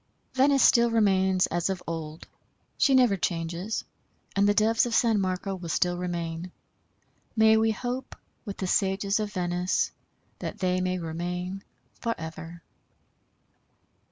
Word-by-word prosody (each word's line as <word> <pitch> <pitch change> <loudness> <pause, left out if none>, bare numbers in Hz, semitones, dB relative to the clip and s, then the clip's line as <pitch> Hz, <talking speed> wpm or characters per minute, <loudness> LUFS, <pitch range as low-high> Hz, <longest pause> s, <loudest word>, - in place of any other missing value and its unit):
Venice 275 +1 +4
still 235 -1 +5
remains 190 -4 +3
as 175 +2 -1
of 190 -2 -3
old. 160 -1 -6 0.5
She 275 - +3
never 245 -6 +4
changes, 170 +4 -2 0.5
and 200 +1 +4
the - - +4
Doves 225 +2 +3
of 230 - -1
San 225 -4 +3
Marco 185 +1 -2
will 180 -3 -7
still 175 +2 +1
remain. 175 -1 -4 0.8
May 220 0 +6
we 220 0 +3
hope, 245 +4 -4 0.3
with 200 -4 -7
the 190 - -3
sages 195 +2 +1
of 210 -1 -3
Venice, 180 0 0 0.5
that - - -5
they 185 -1 0
may 185 0 0
remain 180 +3 -4 0.4
forever. 165 -5 -5
190 Hz, 130 wpm, -27 LUFS, 175-220 Hz, 0.8 s, May